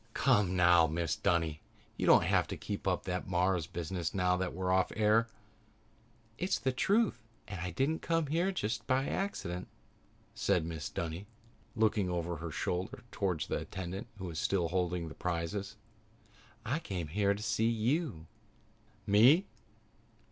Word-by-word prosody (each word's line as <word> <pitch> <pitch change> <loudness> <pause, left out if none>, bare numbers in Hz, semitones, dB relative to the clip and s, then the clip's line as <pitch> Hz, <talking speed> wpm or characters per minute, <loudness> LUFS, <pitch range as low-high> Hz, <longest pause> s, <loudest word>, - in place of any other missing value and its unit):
"Come, 105 -9 +3
now, 85 -2 +6
Mrs. 80 +1 -2
Dunny. 80 -3 +1 0.3
You - - -1
don't - - +7
have - - +2
to - - -5
keep 100 -1 -5
up 90 -1 +1
that 90 -1 -3
Mars 90 -2 +1
business 85 -1 -4
now 90 -1 +2
that 90 0 -2
we're 90 +1 -2
off 95 0 +3
the - - -10
air." 110 +2 +4 1.1
"It's 185 +2 +1
the 130 - 0
truth 200 - +2 0.3
and 95 -4 -6
I 90 - -2
didn't 135 - 0
come 165 -1 +1
here 170 +6 +1
just 110 - -3
by 130 +1 +2
accident," 90 - -3 0.7
said - - +1
Mrs. 80 -3 -5
Dunny, 85 +4 -4 0.5
looking 110 -4 +2
over 85 -1 -2
her 85 +2 -5
shoulder 90 +4 -3
toward 90 -5 -1
the - - -1
attendant 95 +2 -6
who 95 - -6
was 80 -3 -4
still 90 -4 +1
holding 90 -1 -1
the - - -8
prizes. 90 +4 -3 0.9
"I 135 +8 0
came 90 - -4
here 100 +3 +2
to 105 - -7
see 110 +1 +1
you." 115 - 0 0.8
"Me?" 120 - +6
95 Hz, 155 wpm, -32 LUFS, 85-110 Hz, 1.1 s, don't